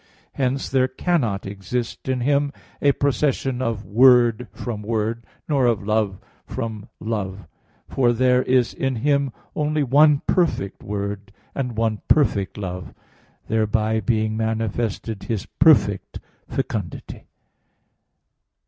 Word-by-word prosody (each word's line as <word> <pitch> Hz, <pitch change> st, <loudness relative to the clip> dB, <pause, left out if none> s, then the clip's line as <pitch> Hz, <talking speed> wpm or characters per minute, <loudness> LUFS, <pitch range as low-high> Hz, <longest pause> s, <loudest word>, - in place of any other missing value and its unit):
Hence 135 Hz, 0 st, -1 dB
there 130 Hz, -1 st, +2 dB
cannot 130 Hz, -, -1 dB
exist 105 Hz, +6 st, -4 dB
in 130 Hz, -1 st, 0 dB
Him 140 Hz, +2 st, +2 dB, 0.3 s
a 140 Hz, -, +5 dB
procession 135 Hz, -2 st, 0 dB
of 115 Hz, -4 st, -2 dB
Word 120 Hz, 0 st, +5 dB
from 110 Hz, 0 st, -5 dB
Word, 110 Hz, +1 st, -2 dB, 0.2 s
nor 140 Hz, -5 st, +2 dB
of 110 Hz, -4 st, 0 dB
Love 105 Hz, -2 st, 0 dB, 0.3 s
from 110 Hz, -2 st, -5 dB
Love: 100 Hz, -3 st, -4 dB, 0.4 s
for 125 Hz, -3 st, +2 dB
there 125 Hz, +1 st, +3 dB
is 125 Hz, -2 st, +2 dB
in 135 Hz, -1 st, -1 dB
Him 140 Hz, -2 st, +2 dB, 0.2 s
only 150 Hz, 0 st, 0 dB
one 145 Hz, +2 st, +5 dB
perfect 160 Hz, -, 0 dB
Word, 100 Hz, 0 st, -4 dB, 0.2 s
and 125 Hz, -5 st, -3 dB
one 110 Hz, -2 st, 0 dB
perfect 105 Hz, -, +2 dB
Love; 90 Hz, -4 st, -6 dB, 0.5 s
thereby 110 Hz, 0 st, +1 dB
being 110 Hz, +1 st, 0 dB
manifested 110 Hz, -1 st, -2 dB
His 110 Hz, -5 st, -2 dB
perfect 115 Hz, -, +3 dB, 0.3 s
fecundity. -, -, -4 dB
115 Hz, 115 wpm, -22 LUFS, 105-130 Hz, 0.5 s, a